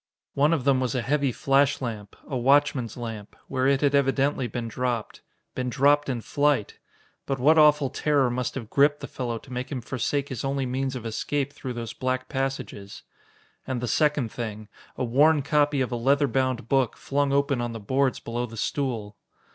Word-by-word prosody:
One 145 +3 +3
of 160 -6 +1
them 135 -1 +3
was 130 -2 -1
a 125 - 0
heavy 140 0 +1
flash 135 +2 +2
lamp 110 -5 -6
a 135 - -4
watchman's 130 -1 +2
lamp 110 -3 -7
where 130 -1 0
it 140 -1 +3
had 145 -1 +2
evidently 135 -1 +2
been 120 -1 -4
dropped. 120 -1 -3 0.3
Been 125 -1 -2
dropped 145 +2 +3
in 125 -3 -2
flight! 145 -5 0 0.5
But 135 - -1
what 155 +5 +5
awful 150 -3 +5
terror 140 -4 +2
must 125 0 -2
have 115 -5 -6
gripped 145 +1 +3
the - - -4
fellow 120 -3 -4
to 125 +3 -11
make 125 +3 -4
him 135 - -2
forsake 135 +4 -2
his 130 - -5
only 135 0 -1
means 130 +1 -2
of 120 -2 -6
escape 140 +5 -2
through 130 -2 -6
those 115 -1 -5
black 130 0 -2
passages? 135 -7 -4 0.6
And 130 -2 -2
the 125 - -3
second 145 -2 +1
thing 110 -3 -6 0.3
a - - -1
worn 145 +5 +4
copy 145 -1 +2
of 130 - -1
a - - -1
leather 140 +4 +3
bound 130 -2 -1
book, 130 -3 +1
flung 140 0 0
open 140 -2 +1
on 120 0 -2
the 115 - -6
boards 130 +5 0
below 120 +1 -3
the 115 0 -11
stool! 110 -5 -2
130 Hz, 195 wpm, -26 LUFS, 120-140 Hz, 0.6 s, what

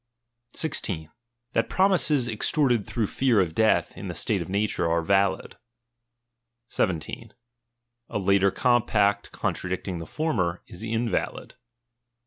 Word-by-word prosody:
16. 85 - -2 0.4
That 115 0 +1
promises 170 -9 +3
extorted 120 0 +1
through 110 +1 -1
fear 120 +1 +2
of 85 -4 +1
death, 110 +4 +2
in - - -7
the - - -5
slate - - 0
of - - -6
nature 100 -3 0
are 85 0 +1
valid. 95 +1 +1 1.1
17 85 -4 -2 0.7
A - - -2
later 100 0 +3
compact 105 -3 +2
contradicting 90 -1 -3
the 80 - -7
former, 90 - -1
is 90 - -10
invalid. 115 +1 -2
105 Hz, 115 wpm, -26 LUFS, 95-120 Hz, 1.1 s, promises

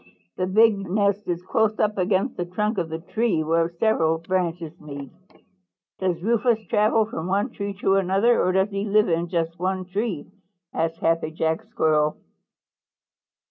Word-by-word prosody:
The 185 - -1
big 215 +1 +4
nest 200 +1 +1
is 175 0 -2
close 215 +3 +1
up 210 -1 0
against 190 +6 +1
the 175 - -2
trunk 210 +4 -1
of 170 -2 -2
the 160 - -3
tree 180 0 0
where 165 +1 +1
several 170 -3 +1
branches 170 -1 -2
meet." 140 -2 -8 0.9
"Does 180 -2 -1
Rufous 225 0 +1
travel 215 +2 +2
from 175 -6 -5
one 195 +2 0
tree 200 -1 -5
to 195 0 +3
another, 195 +5 +3
or 185 - +2
does 190 +2 +1
he 200 0 -2
live 210 0 +3
in 170 +1 0
just 165 -1 -2
one 185 +1 -1
tree?" 195 -3 -3 0.5
asked 165 0 -1
Happy 165 -1 +1
Jack 160 +2 -1
Squirrel. 155 -7 +1
185 Hz, 160 wpm, -24 LUFS, 165-210 Hz, 0.9 s, big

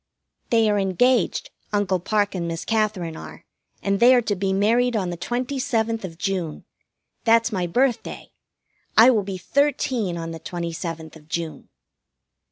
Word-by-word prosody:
They 225 -2 +4
are 205 -1 +2
engaged. 245 - +1 0.2
Uncle 200 -3 +1
Parke 205 +3 0
and 175 -3 -3
Miss 165 -1 -4
Katherine 215 -7 -1
are, - - -10 0.4
and 200 0 +1
they 250 +2 +7
are 245 - +4
to 205 - -1
be 195 0 -1
married 230 +5 +2
on 185 -4 -1
the - - -4
twenty 245 +9 -3
seventh 225 -4 0
of 165 -3 -7
June. 180 -4 -3 0.6
That's 230 +1 +4
my 185 -4 -1
birthday. 245 +7 -1 0.7
I 230 +4 +9
will 220 -4 +2
be 195 -1 -5
thirteen 250 -4 0
on 165 0 -5
the 165 - -7
twenty 170 +1 -5
seventh 160 -2 -6
of 155 -1 -16
June. 165 -1 -4
200 Hz, 165 wpm, -23 LUFS, 175-230 Hz, 0.7 s, I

